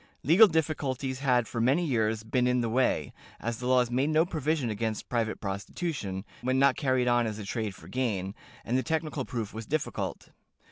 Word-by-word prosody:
Legal 180 - +7
difficulties 140 -6 -1
had 125 -4 +2
for 115 - -3
many 140 +9 +3
years 110 -5 0
been 125 +3 +1
in 125 0 +2
the 115 - -1
way, 125 +3 +1 0.3
as 115 0 -3
the 125 - -3
laws 125 -2 +3
made 130 +4 +1
no 155 +1 +4
provision 155 -6 -1
against 110 +1 -3
private 115 -3 -1
prostitution, 100 - -4 0.2
when 130 +1 +1
not 135 0 +5
carried 130 -3 +1
on 120 -1 +3
as 105 -1 -4
a 105 - -6
trade 105 -1 -3
for - - -14
gain, 100 -7 -2 0.3
and 120 - -1
the 130 - +3
technical 155 -3 -2
proof 115 -4 -4
was 110 0 -7
difficult. 155 0 -3
125 Hz, 190 wpm, -29 LUFS, 110-140 Hz, 0.3 s, Legal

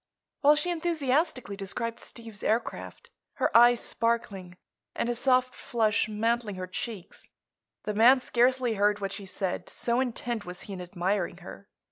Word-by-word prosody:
While 295 +1 +6
she 355 +4 0
enthusiastically 310 - 0
described 225 +4 -4
Steve's 225 -3 -10
aircraft, 225 +2 -2 0.2
her - - -1
eyes 240 0 +7
sparkling 200 -6 -2 0.4
and - - -1
a - - +1
soft 255 +1 +2
flush 215 -2 0
mantling 225 0 -1
her 185 0 -4
cheeks, 190 0 -7 0.5
the 210 - -2
man 240 +5 +6
scarcely 250 -1 +2
heard 205 0 +2
what 195 -1 -3
she 200 -1 -7
said, 190 -1 -3
so 235 +1 0
intent 240 -3 -2
was 180 -1 -7
he 200 - -8
in 185 - -6
admiring 180 +3 -2
her. - - -11
230 Hz, 150 wpm, -28 LUFS, 200-250 Hz, 0.5 s, eyes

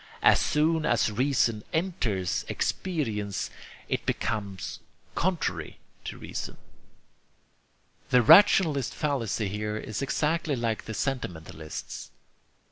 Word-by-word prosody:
As - - +7
soon 160 +2 +2
as 120 -5 +2
reason 120 -2 +1
enters 140 - 0
experience, 110 - -2 0.4
it - - -1
becomes 100 -3 -3 0.3
contrary 180 0 -1 0.3
to - - -5
reason." - - -6 1.5
The 125 -1 +5
rationalist's 165 - +6
fallacy 120 -8 -1
here 105 +2 -3
is 110 +2 -4
exactly 150 +2 0
like 115 -3 -2
the 110 - -5
sentimentalist's. 85 - -4
120 Hz, 95 wpm, -28 LUFS, 105-155 Hz, 1.5 s, As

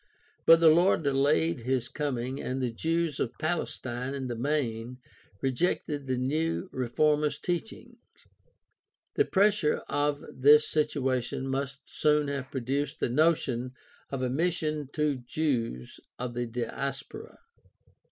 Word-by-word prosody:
But 165 0 +9
the 165 -1 +7
Lord 170 +1 +4
delayed 140 +3 +2
his 125 0 -1
coming 130 -3 -3
and 130 +1 -3
the 125 -2 -1
Jews 165 +4 -1
of 120 - -2
Palestine 135 -6 -3
in 135 -1 -4
the 120 - -2
main 125 -2 -2 0.4
rejected 145 +1 -1
the 130 -1 0
new 155 +8 -1
reformers' 150 +4 +1
teaching. 175 +4 -4 1.2
The 425 - +3
pressure 200 - +2
of 145 0 0
this 150 +3 +6
situation 135 -4 -1
must 140 +1 -3
soon 150 -1 +1
have 140 -2 -4
produced 140 +4 -2
the - - 0
notion 130 -3 +1 0.4
of 135 -2 -3
a 125 - 0
mission 155 -2 -1
to 150 -3 +1
Jews 120 - -2 0.2
of 125 -1 -4
the 120 0 -2
Diaspora. 140 - -5
140 Hz, 125 wpm, -29 LUFS, 130-155 Hz, 1.2 s, But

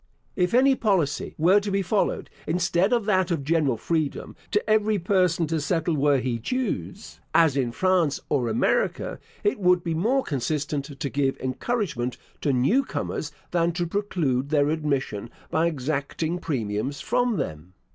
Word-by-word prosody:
If 180 +3 +1
any 270 +2 +6
policy 190 - 0
were 180 +6 +5
to 205 0 -4
be 195 0 0
followed, 200 +3 0 0.2
instead 180 +4 +1
of 235 -4 +2
that 190 -3 +2
of 165 -5 -1
general 150 -5 +1
freedom, 155 +3 -2
to 210 -1 0
every 215 0 +3
person 180 -2 +2
to 160 0 -1
settle 165 +2 0
where 145 -1 +3
he 125 -2 -2
chose 220 - -3 0.2
(as 160 -5 +5
in 130 -4 0
France 180 -1 +2
or 130 -5 0
America) 110 - 0 0.2
it 205 +1 +1
would 180 -2 +3
be 165 - -1
more 235 +12 +1
consistent 145 +1 -2
to 145 -3 -2
give 135 -1 0
encouragement 130 - -2 0.2
to 145 - +1
new 135 - +3
comers 155 - -4 0.2
than 170 -1 +1
to 175 0 -1
preclude 165 -9 -1
their 145 -1 +3
admission 140 -8 -2 0.2
by 160 +1 +2
exacting 155 +3 -2
premiums 130 -3 -2
from 245 - +1
them. 80 +4 -5
165 Hz, 155 wpm, -25 LUFS, 140-190 Hz, 0.2 s, any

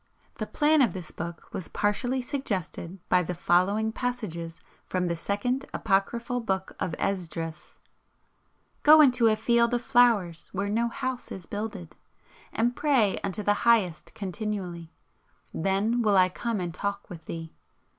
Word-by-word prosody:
The - - -2
plan 300 0 +3
of 230 -9 +3
this 180 -4 -7
book 170 0 -7
was 180 - -4
partially 245 +5 0
suggested 195 - -4
by 180 - +4
the 180 +1 -3
following 195 +6 +2
passages 200 -10 -4 0.3
from 180 -1 -1
the 170 -1 0
Second 225 +10 -1
Apocryphal 230 +4 0
Book 190 -4 -2
of 165 - -2
Esdras: 165 -4 -4 1.0
"Go 305 +1 +8
into 255 -5 +6
a 215 - +4
field 235 +2 +2
of 240 - -2
flowers 215 -9 +3
where 200 +1 -1
no 230 +3 +1
house 255 +1 -4
is 185 -3 -7
builded. 205 -5 -6 0.6
And 240 +2 +1
pray 260 -10 +2
unto 205 +2 -1
the 205 0 +1
Highest 195 -8 +2
continually, 190 -5 -4 0.6
then 200 +7 +1
will 210 -3 +3
I 185 0 +5
come 230 +3 -3
and 175 -2 -3
talk 200 +3 -3
with 165 -3 -10
thee. 165 -1 -6
205 Hz, 145 wpm, -27 LUFS, 180-235 Hz, 1.0 s, Go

